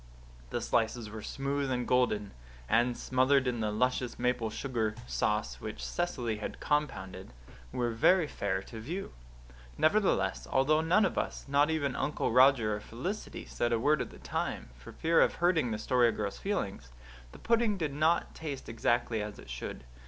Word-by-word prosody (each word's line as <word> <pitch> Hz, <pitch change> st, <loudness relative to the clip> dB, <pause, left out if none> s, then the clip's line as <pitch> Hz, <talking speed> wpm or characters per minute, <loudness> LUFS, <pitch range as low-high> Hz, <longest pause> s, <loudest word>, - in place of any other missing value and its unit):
The -, -, -2 dB
slices 115 Hz, -1 st, 0 dB
were 110 Hz, 0 st, -7 dB
smooth 140 Hz, +3 st, -2 dB
and 125 Hz, -2 st, -1 dB
golden; 105 Hz, -5 st, +2 dB, 0.4 s
and, 120 Hz, +2 st, +2 dB
smothered 130 Hz, +1 st, +3 dB
in 125 Hz, -2 st, -1 dB
the 110 Hz, -1 st, 0 dB
luscious 125 Hz, +3 st, 0 dB
maple 125 Hz, -2 st, 0 dB
sugar 110 Hz, -2 st, -2 dB
sauce 100 Hz, -, -1 dB
which -, -, -5 dB
Cecily 125 Hz, -11 st, -2 dB
had 105 Hz, -, -6 dB
compounded, 95 Hz, -, -2 dB, 0.4 s
were 120 Hz, -1 st, -1 dB
very 165 Hz, +10 st, +4 dB
fair 95 Hz, -8 st, -2 dB
to 115 Hz, -, -9 dB
view. 170 Hz, -, -5 dB, 0.6 s
Nevertheless, 200 Hz, +5 st, +2 dB
although 150 Hz, +4 st, +3 dB
none 180 Hz, +6 st, +4 dB
of 185 Hz, -, 0 dB
us, -, -, -4 dB
not 145 Hz, +2 st, +3 dB
even 145 Hz, -4 st, 0 dB
Uncle 150 Hz, -, -1 dB
Roger 125 Hz, -4 st, +5 dB
or -, -, -5 dB
Felicity, 175 Hz, -, -5 dB
said 120 Hz, -, -1 dB
a 115 Hz, -, +2 dB
word 145 Hz, +3 st, +3 dB
at -, -, -4 dB
the -, -, -13 dB
time, -, -, -3 dB
for -, -, -12 dB
fear 165 Hz, +1 st, +3 dB
of -, -, +3 dB
hurting 170 Hz, -7 st, +2 dB
the 110 Hz, -, -2 dB
Story 120 Hz, +1 st, +3 dB
Girl's 105 Hz, -3 st, -4 dB
feelings, 100 Hz, -, -3 dB, 0.4 s
the -, -, -12 dB
pudding 230 Hz, -3 st, +2 dB
did 155 Hz, -5 st, -2 dB
not 155 Hz, +4 st, +2 dB
taste 145 Hz, -4 st, -6 dB
exactly 115 Hz, 0 st, 0 dB
as 105 Hz, 0 st, -6 dB
it -, -, -11 dB
should. -, -, -6 dB
125 Hz, 170 wpm, -31 LUFS, 110-150 Hz, 0.6 s, Roger